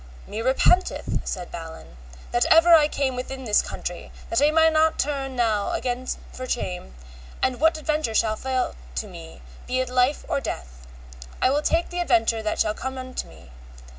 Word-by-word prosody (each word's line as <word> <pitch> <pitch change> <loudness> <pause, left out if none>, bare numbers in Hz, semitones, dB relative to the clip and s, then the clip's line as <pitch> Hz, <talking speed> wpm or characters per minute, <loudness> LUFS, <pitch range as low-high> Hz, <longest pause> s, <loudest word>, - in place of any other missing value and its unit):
Me 215 +2 -5
repenteth, 265 +9 +2
said 180 -2 -4
Balin, 160 - -9 0.4
that 240 0 +2
ever 330 +1 +7
I 305 -2 +7
came 275 -3 -1
within 260 +1 -5
this 215 -4 +3
country, - - -6 0.2
but 230 - +2
I 295 - +5
may 320 +1 +5
not 315 0 +3
turn 275 -2 -2
now 220 -4 +1
again 250 0 -2 0.3
for 255 0 -7
shame, 180 - -3 0.5
and 255 -1 +1
what 320 +2 +3
adventure 305 -6 -1
shall 215 -1 +2
fall 260 +2 -1 0.2
to 65 - -2
me, - - -11 0.2
be 255 - 0
it 255 -1 -1
life 250 +3 +1
or 275 - -1
death, 60 - -7 0.5
I 255 - +3
will 290 +2 +2
take 330 +3 0
the 355 - -3
adventure 225 -9 +2
that 215 -1 -2
shall 215 - +2
come 260 +1 -6
to - - -4
me. 60 0 -16
255 Hz, 180 wpm, -24 LUFS, 220-295 Hz, 0.5 s, ever